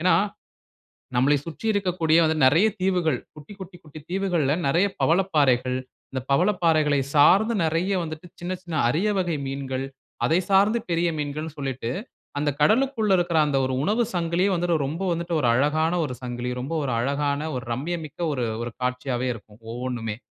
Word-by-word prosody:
ஏன்னா, 180 -1 +4 1.0
நம்மளை 135 +4 +4
சுற்றி 165 +7 -8
இருக்கக்கூடிய 175 -5 +2
வந்து 160 0 +1
நிறைய 160 +11 +5
தீவுகள், 180 -7 +1 0.2
குட்டி, 150 +7 -12
குட்டி, 185 -1 -9
குட்டி 155 0 -11
தீவுகள்ல 180 -7 +1
நிறைய 170 +8 +3 0.2
பவளப்பாறைகள், 145 -8 +2 0.4
இந்த 130 -1 -3
பவளப்பாறைகளை 160 -4 +3 0.2
சார்ந்து 200 +10 +5
நிறைய 165 +5 0
வந்துட்டு 155 +2 -7
சின்ன 175 +1 -3
சின்ன 170 -3 -4
அரிய 180 - +1
வகை 175 -4 0
மீன்கள், 135 -1 -3 0.4
அதை 165 +3 +3
சார்ந்து 205 +4 +4
பெரிய 170 0 +2
மீன்கள்ன்னு 150 +2 -4
சொல்லிட்டு 130 -4 -3 0.5
அந்த 145 0 +1
கடலுக்குள 220 - +3
இருக்குற 170 -2 +1
அந்த 140 - +1
ஒரு 130 - -2
உணவு 215 +7 +2
சங்கிலியே 175 +3 +1
வந்து 175 +1 -1 0.2
ரொம்ப 165 +6 -4
வந்துட்டு, 170 0 -3
ஒரு 125 - +2
அழகான 155 +6 +2
ஒரு 130 -3 -5
சங்கிலி 120 0 -4
ரொம்ப 145 +6 -4
ஒரு 125 - -1
அழகான, 140 +4 -1
ஒரு 125 - -6
ரம்மியமிக்க 155 +4 -5
ஒரு 125 -3 -1 0.2
ஒரு 120 0 -6
காட்சியாகவே 125 0 -1
இருக்கும் 105 -1 -14
ஒவ்வொன்னுமே. 120 -3 -4
155 Hz, 155 wpm, -24 LUFS, 135-180 Hz, 1.0 s, நிறைய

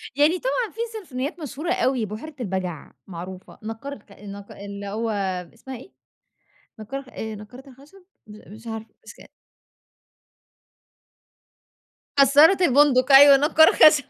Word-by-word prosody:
يعني 310 +5 +2
طبعًا - - -2
في 455 - -17
سيمفونيات 325 - -6
مشهورة 305 +4 -4
أوي، 260 -11 0
بحيرة 235 +9 -9
البجع 185 -7 -5 0.2
معروفة، 185 +1 -10
نقّار 225 +6 -7
الخ 205 -5 -15
النق 200 0 -11
اللي 200 0 -9
هو 225 +3 -3 0.4
إسمها 260 +2 -10
إيه؟ 265 - -15 0.9
نقّار 270 +5 -7
آآ، 220 -3 -7
نقارة 245 +7 -13
الخشب؟ 290 +9 -19 0.2
م 210 -1 -14
مش 225 +2 -13
عارفة، 225 0 -8
مش - - -11
ك - - -17 2.9
كسارة 290 +6 +6
البندق، 275 -1 +3
أيوه 275 0 +9
نقّار 315 +2 +4
الخشب. 305 -2 +5
260 Hz, 130 wpm, -23 LUFS, 210-295 Hz, 2.9 s, أيوه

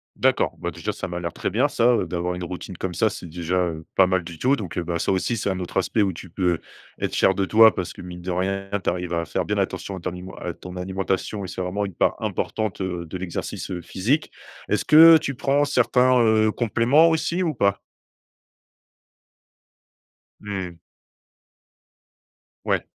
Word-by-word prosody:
D'accord, - - +1
bah, 85 0 -3
déjà 85 +5 -4
ça 95 -1 -5
m'a 90 0 -4
l'air 85 -1 -4
très - - -3
bien - - +2
ça, 120 +1 +3
heu, 95 - 0
d'avoir 90 +1 -2
une 90 - -5
routine 90 +1 -6
comme 90 0 -4
ça, 110 +6 +2
c'est 100 - -8
déjà, 85 +2 -3
heu, 80 -1 -6
pas 95 - +6
mal 95 -1 +1
du 85 -1 -9
tout 130 - +2
donc, 100 -5 -6
heu, 85 - 0
bah, 85 0 -2
ça - - 0
aussi, 115 +5 0
c'est 100 - -1
un 95 - -2
autre 90 0 -5
aspect 95 +4 +1
où 100 -2 +2
tu 90 +1 -10
peux 90 -1 0 0.4
être - - -2
fier 95 - +4
de 100 - 0
toi 110 +2 +7
parce 90 - -4
que, - - -11
mine 90 0 -9
de 90 +1 -4
rien, 95 +2 -2
tu - - +1
arrives 90 0 -3
à 85 0 0
faire - - -2
bien - - -1
attention 100 - -2
à - - -7
ton 90 - -3
nimen 90 +1 -9
à 90 - -3
ton 90 +1 -10
alimentation 95 +2 -2
et - - -6
c'est 90 +1 -5
vraiment 100 +3 -2
une 95 - -7
part - - +1
importante, 110 -3 -2
heu, 90 -2 -3
de 90 +3 -6
l'exercice 90 0 -5
physique. 125 - -1 0.4
Est-ce - - 0
que 160 +1 +9
tu 140 -4 -4
prends 140 +3 +2
certains, 125 -2 +3
heu, 110 -1 +4
compléments 120 +8 +3
aussi 165 +2 0
ou 160 - 0
pas? 100 -6 +1 2.6
Mmh. 95 -5 -5 1.9
Ouais. - - 0
95 Hz, 200 wpm, -23 LUFS, 90-110 Hz, 2.6 s, que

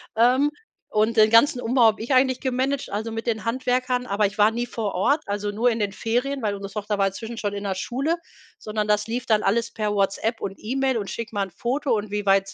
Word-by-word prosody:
Ähm, 250 +5 +4 0.4
und 215 +2 +2
den 215 -1 +6
ganzen 245 +4 +5
Umbau 245 +1 +2
habe 220 -1 +4
ich 235 +5 -1
eigentlich 260 0 +3
gemanagt, 265 +1 -1
also 220 +2 -3
mit 225 0 -4
den 225 -2 -2
Handwerkern, 250 +1 0
aber 205 -2 +1
ich 200 +2 -3
war 210 +1 +5
nie 240 +2 -2
vor 220 -4 -3
Ort, 280 - +2
also 205 0 -2
nur 225 +4 +2
in 230 -1 -1
den 205 -2 -1
Ferien, 250 +6 -1
weil 210 -2 0
unsere 195 0 -7
Tochter 210 -1 -2
war 195 -1 +3
inzwischen 225 +4 -6
schon 205 -2 -2
in 200 0 -5
der 195 -2 -2
Schule, 275 - -1 0.4
sondern 215 0 -3
das 210 +1 +2
lief 235 +2 -3
dann 215 -2 +3
alles 230 +4 +1
per 210 -1 -2
WhatsApp 205 +3 0
und 195 - -4
E-Mail 265 +2 -1
und: 200 -3 -4
„Schick 225 +3 -5
mal 205 -2 -1
'n - - -18
Foto 265 +9 -1
und 210 -1 -4
wie 205 0 -2
weit 195 0 +2
225 Hz, 240 wpm, -24 LUFS, 205-250 Hz, 0.4 s, den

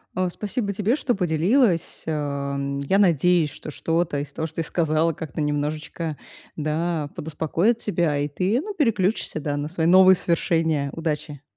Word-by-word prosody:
А, 185 0 +1
спасибо 205 +2 -3
тебе, 210 +5 +1
что 270 -4 0
поделилась. 180 - +1
Эм, 140 -2 -2
я 140 +8 +1
надеюсь, 175 -4 +3
что - - -9
что-то 165 0 -1
из 140 0 -6
того, 160 - -3
что 160 - -17
ты 165 - 0
сказала, 160 0 +1
как-то 155 -1 -7
немножечко, 150 +2 -2 0.4
да, 155 0 -1
подуспокоит 160 +8 0
тебя, 170 -9 0
и 145 +1 0
ты, 185 - 0
ну, 415 +5 -6
переключишься, 220 - 0
да, 145 -1 -2
на 145 +1 -3
свои 165 -1 -1
новые 185 +2 +7
свершения. 160 -4 0
Удачи! 150 -3 -4
160 Hz, 155 wpm, -24 LUFS, 150-185 Hz, 0.4 s, новые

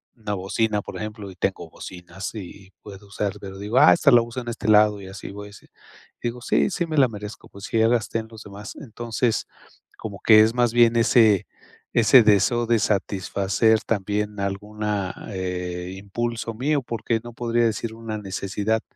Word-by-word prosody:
Una 105 -3 -4
bocina, 105 +2 -1
por - - -9
ejemplo, 105 -2 -6
y - - -14
tengo 90 - -3
bocinas 90 +3 -8
y 95 -1 -9
puedo 100 -1 -12
usar, 100 0 -2
pero 95 -1 -8
digo: 105 +6 0
"Ah, 150 - +8
esta 145 - +4
la 120 -2 +7
uso 120 +2 -5
en 120 - -12
este 115 -2 -4
lado", 105 -1 +5
y 95 - -9
así, 95 +1 -8
voy 105 +1 -9
así. 100 - -15 0.6
Digo: 120 +1 -3
"Sí, - - +2
sí 180 -3 -2
me 160 -2 -4
la 130 - +6
merezco. 105 -1 -9
Pues 100 - -13
sí, 115 - -1
ya 110 - +5
gasté 115 -1 0
en 110 - -7
los 110 -1 -11
demás". 100 +1 -9
Entonces, 115 -2 -2 0.5
como 100 -3 -7
que 110 -1 +7
es 110 +1 +3
más 120 -2 +2
bien 120 0 +4
ese 110 -4 +4 0.5
ese 120 +2 +7
deseo 110 +3 +3
de 120 - +3
satisfacer 100 +2 +1
también 105 0 -2
alguna 100 0 -3 0.2
eh, 90 -1 -4
impulso 115 +4 -4
mío, 140 +5 0
porque 115 -1 -2
no 120 - -9
podría 120 0 0
decir 110 0 -2
una 115 -1 -5
necesidad, 100 +3 -2
105 Hz, 185 wpm, -23 LUFS, 100-115 Hz, 0.6 s, Ah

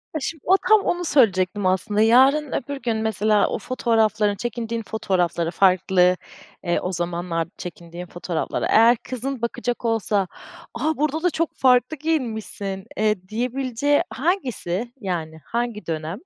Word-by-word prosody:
A, - - 0
şimdi 305 +2 -5
o 375 - +6
tam 435 -1 +7
onu 355 -2 -1
söyleyecektim 200 - +2
aslında, 190 +3 +1
yarın, 265 +6 +5
öbür 280 +3 -3
gün 230 -2 -1
mesela 215 -1 +2
o - - -2
fotoğrafların 220 -4 +1
Çekindiğin 230 +1 -4
fotoğrafları 180 -6 -1
farklı, 185 -1 +3 0.5
eee 175 -2 +1
O 180 - -3
zamanlar 170 -1 -2
çekindiğin 175 0 -8
fotoğraflara 175 -1 -3
eğer 230 +2 +5
kızın 255 +1 -5
bakacak 240 0 -3
olsa, 210 -4 +1 0.5
"A, 295 +6 -1
burada 305 +3 -1
da 360 - +4
çok 330 0 -2
farklı 255 +3 +3
giyinmişsin." 220 -10 -3
eee, 210 -3 0
diyebileceği 255 +4 0
hangisi, 245 - -2
yani 165 -5 -4
hangi 235 -2 -3
dönem? 160 +3 -4
220 Hz, 135 wpm, -23 LUFS, 185-255 Hz, 0.5 s, tam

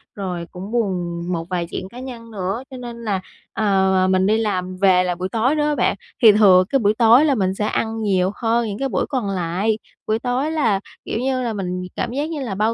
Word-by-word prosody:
rồi 180 -4 -4
cũng 190 +4 -8
buồn 180 -7 -1
một 165 -1 -3
vài 175 -2 -2
chuyện 190 - -5
cá 245 - -10
nhân 235 -3 -8
nữa 195 +4 -3
cho 260 - -7
nên 235 -1 -8
là, 195 -4 -1 0.3
ờ, 220 - -2 0.4
ờ, 185 - +3
mình 185 0 +2
đi 215 +1 +3
làm 185 -4 -2
về 185 -2 +4
là 180 -1 -1
buổi 185 +2 -4
tối 240 +8 +1
đó 295 0 +1
bạn, - - +1 0.3
thì 220 -3 +9
thừa 195 -3 +6
cái 275 0 +2
buổi 210 -1 +3
tối 240 +5 +6
là 285 -3 +3
mình 190 -4 0
sẽ 210 +2 -2
ăn 225 +1 -1
nhiều 190 -2 +1
hơn 230 0 0
những 205 0 -5
cái 270 0 -1
buổi - - 0
còn 250 -8 -1
lại. 190 +4 0 0.3
Buổi 220 +1 +1
tối 255 +6 -1
là, 230 -11 +1 0.3
kiểu - - -2
như 260 +1 0
là, 235 -3 -2
mình 180 -2 -3
cảm 235 - -2
giác 290 +5 -2
như 310 -3 -4
là 225 -7 -3
bao 215 +3 +1
215 Hz, 240 wpm, -21 LUFS, 185-240 Hz, 0.4 s, thì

